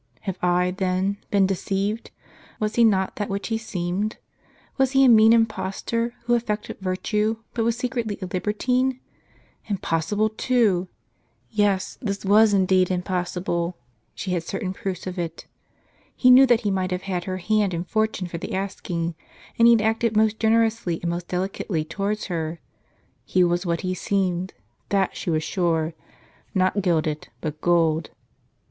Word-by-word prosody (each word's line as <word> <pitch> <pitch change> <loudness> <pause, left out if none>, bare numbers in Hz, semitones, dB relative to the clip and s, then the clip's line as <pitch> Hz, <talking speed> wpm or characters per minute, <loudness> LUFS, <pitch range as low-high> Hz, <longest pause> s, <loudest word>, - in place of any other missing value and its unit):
Have 190 -1 -4
I, 180 0 +2
then, 190 +1 -1
been 200 -1 +4
deceived? 195 +3 -2 0.5
Was 215 0 -1
he 235 - +4
not 190 -4 +2
that 205 - -2
which 200 +2 -3
he 225 -1 0
seemed? 195 0 -3 0.6
Was 265 -1 +2
he 270 0 +6
a - - +7
mean 220 -2 +7
impos 225 -4 +1
tor, 235 +1 -1
who 240 0 +1
affected 215 -3 -2
virtue, 210 +4 0 0.2
but 230 - 0
was 230 0 +1
secretly 240 -4 -2
a 190 - -4
liber 185 +3 -2
tine? 255 +4 0 0.7
Impossible, 200 +1 0
too! 215 -5 +1 0.6
Yes, 205 -3 0
this 200 -5 -3
was 210 +2 +6
indeed 185 -2 +3 1.3
She 190 - -4
had 175 -2 0
certain 185 +2 -4
proofs 190 -2 -5
of 185 -1 -5
it. 170 -2 -5 0.7
He 255 - +5
knew 265 +2 +8
that 240 -1 +4
he 205 -3 0
might 185 -1 0
have 180 0 -3
had 185 -3 -3
her 185 -1 -3
hand 205 +1 +1
and 170 +1 -4
fortune 215 -2 0
for 170 -1 -6
the - - -4
asking, 175 -3 -3 0.5
and 230 - +7
he 235 - +8
had 220 -2 +3
acted 225 0 +1
most 220 0 +3
generously 225 -6 +2
and 170 - 0
most 175 0 -4
delicately 180 -3 -2
towards 200 +6 -2
her. 165 -2 -3 0.6
He 185 - +2
was 175 +1 +1
what 170 -1 0
he 185 -1 -1
seemed, 185 -1 -1 0.3
that 195 -2 +1
she - - -4
was 155 -1 +1
sure 165 -2 0 0.3
— - - -32
not 185 +2 +2
gilded, 155 -4 0
but 155 -1 -5
gold. 165 -2 +2
195 Hz, 165 wpm, -24 LUFS, 180-220 Hz, 1.3 s, knew